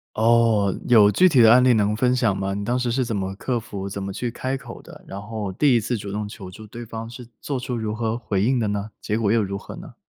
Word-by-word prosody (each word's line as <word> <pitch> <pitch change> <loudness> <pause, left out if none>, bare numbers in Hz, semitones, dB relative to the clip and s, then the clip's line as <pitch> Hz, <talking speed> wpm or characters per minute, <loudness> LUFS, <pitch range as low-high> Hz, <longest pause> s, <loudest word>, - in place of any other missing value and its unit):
哦， 110 -3 +3
有 110 -4 +7
具 185 - +4
体 140 -6 +3
的 115 - +7
案 125 +1 +6
例 130 - +5
能 105 -1 +1
分 125 +3 +2
享 115 -6 +1
吗？ 95 0 -2
你 100 +1 -4
当 120 +3 0
时 125 -1 -1
是 130 +1 0
怎 115 - -3
么 95 -1 -3
克 125 +4 -2
服， 100 -4 -6
怎 100 0 -5
么 100 - -4
去 120 +5 -3
开 130 +3 -3
口 135 -4 -11
的， - - -15
然 100 - -7
后 105 -2 -5
第 140 +7 +3
一 120 - +4
次 115 +3 -2
主 100 -2 -6
动 105 +1 -3
求 100 -3 -10
助 110 +3 -12
对 120 +3 -9
方 115 0 -7
是 120 +1 -10
做 140 - -3
出 125 -1 -4
如 110 -1 -3
何 115 0 -2
回 100 -5 -1
应 125 +3 +2
的 110 - 0
呢？ 105 +1 -3
结 105 - -2
果 110 -3 +1
又 115 0 +3
如 100 -1 -3
何 100 - -10
呢？ - - -11
110 Hz, 305 characters per minute, -23 LUFS, 100-120 Hz, -, 有